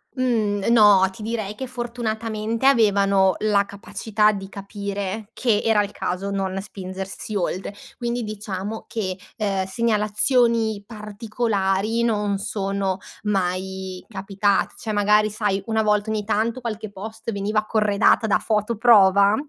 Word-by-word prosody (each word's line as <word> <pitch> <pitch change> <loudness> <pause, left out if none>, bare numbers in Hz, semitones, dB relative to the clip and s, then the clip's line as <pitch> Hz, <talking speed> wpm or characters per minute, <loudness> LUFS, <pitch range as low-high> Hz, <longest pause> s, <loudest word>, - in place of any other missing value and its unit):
Mhmm, 220 -6 0
no, 205 -4 +6
ti 215 - -12
direi 215 -2 -3
che 260 +5 -6
fortunatamente 230 -2 -3
avevano 200 -7 +4
la 205 -2 +2
capacità 210 +1 0
di 195 -2 -6
capire 200 +1 -5
che 225 -4 +1
era 215 -2 +3
il 205 - -6
caso 195 0 -3
non 195 -1 -2
spingersi 195 +1 -7
oltre. 190 +1 -2 0.2
Quindi 240 -1 -2
diciamo 210 0 -5
che, 190 -5 -3 0.2
ehm, 195 -4 -1
segnalazioni 220 +1 +1
particolari 215 -1 -1
non 210 -3 0
sono 195 -2 -2 0.3
mai 190 -1 -2
capitate, 200 -1 0
cioè 220 - -4
magari 210 +1 +3
sai 205 -2 -1
una 220 -1 +1
volta 210 0 +1
ogni 215 -1 -1
tanto 225 +4 -1
qualche 220 -2 -5
post 220 +3 -7
veniva 210 +1 -1
corredata 215 +1 +3
da 205 - +3
foto 215 +1 0
prova 200 -3 +6
210 Hz, 130 wpm, -23 LUFS, 195-220 Hz, 0.3 s, no